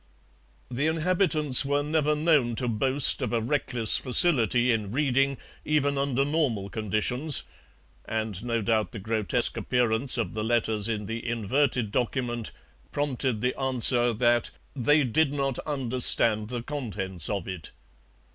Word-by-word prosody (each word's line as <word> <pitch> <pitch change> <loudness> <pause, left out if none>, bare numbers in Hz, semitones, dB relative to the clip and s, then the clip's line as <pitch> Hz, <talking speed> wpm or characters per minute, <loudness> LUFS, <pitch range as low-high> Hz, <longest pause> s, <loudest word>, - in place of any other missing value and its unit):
The 135 +5 -1
inhabitants 160 -4 +3
were 145 +1 -1
never 150 0 0
known 150 -7 +1
to 125 +1 -3
boast 130 +5 +2
of 125 - -3
a 120 - 0
reckless 120 -2 +2
facility 125 - +4
in 105 -3 -3
reading, 135 0 0 0.3
even 145 -2 0
under 140 -1 -1
normal 135 -10 -2
conditions, 115 +7 0 0.6
and 110 -2 -4
no 115 -2 -2
doubt 110 0 -1
the 110 - -7
grotesque 110 +4 0
appearance 120 +2 +1
of 115 - -3
the 110 0 -4
letters 110 -2 -1
in 105 -2 -4
the 115 +3 -6
inverted 120 0 -1
document 120 -1 -3 0.4
prompted 130 -5 -2
the 125 +1 -1
answer 125 -2 +3
that 120 +1 0 0.3
'they 145 +3 +2
did 140 +4 0
not 135 -3 -2
understand 120 -5 +3
the 120 -1 -5
contents 100 - -4
of 100 -4 -4
it.' 95 -5 -7
125 Hz, 135 wpm, -25 LUFS, 110-140 Hz, 0.6 s, facility